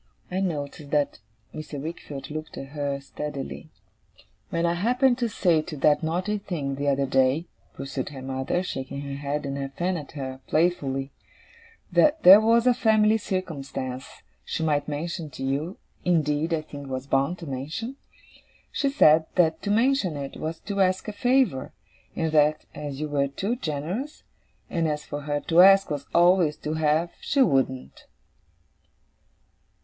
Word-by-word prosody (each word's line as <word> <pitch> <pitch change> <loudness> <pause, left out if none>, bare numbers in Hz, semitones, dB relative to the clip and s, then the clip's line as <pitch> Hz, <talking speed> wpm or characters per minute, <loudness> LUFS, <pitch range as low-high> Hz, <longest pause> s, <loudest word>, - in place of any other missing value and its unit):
I 185 - -1
noticed 150 -4 -3
that 145 -1 0 0.3
Mr. 155 -2 -6
Wickfield 145 -2 -7
looked 155 0 -6
at 135 - -7
her 140 -1 -3
steadily. 140 - -6 0.8
'When 170 0 0
I 170 - +2
happened 245 +7 +2
to 240 -2 0
say 175 -6 +2
to 155 -1 -8
that 145 +2 +3
naughty 180 +6 -1
thing, 150 -8 -3
the 140 +1 -3
other 140 0 +2
day,' 135 +4 +2 0.3
pursued 135 -1 -4
her 135 -3 -9
mother, 130 +6 -1
shaking 135 -4 -5
her 140 -1 -5
head 140 +1 -3
and 140 0 -3
her 135 0 -3
fan 175 +6 -2
at 150 -1 -9
her, 130 -3 -5
playfully, 140 -5 0 0.8
'that 310 +1 +3
there 195 +4 +10
was 230 +2 +4
a 250 - +6
family 220 -2 +3
circumstance 140 -9 -5 0.2
she 160 - -3
might 145 -2 +1
mention 155 +2 -4
to 135 - -8
you 145 +7 -2 0.3
indeed, 160 -2 +1
I 160 -2 0
think, 145 -2 -9
was 130 0 -4
bound 140 +5 +1
to 170 - -9
mention 155 - -5 0.7
she 280 - 0
said, 160 - +5
that 160 -3 +3
to 205 - -4
mention 220 - +2
it 140 -1 -6
was 160 +1 -4
to 200 -2 -2
ask 185 +2 +1
a - - -5
favour; 245 - +1 0.4
and 160 -1 -1
that, 150 0 +3
as 145 -2 -6
you 155 - -2
were 140 -1 +1
too 195 - -2
generous, 185 - -4 0.4
and 165 -2 0
as 150 -1 -2
for 145 0 -5
her 145 0 -2
to 170 +1 +5
ask 195 -1 +7
was 145 -1 -4
always 175 -3 +4
to 150 - -4
have, 160 +2 +1
she 275 -2 +3
wouldn't. 130 - -1
155 Hz, 165 wpm, -25 LUFS, 140-185 Hz, 0.8 s, there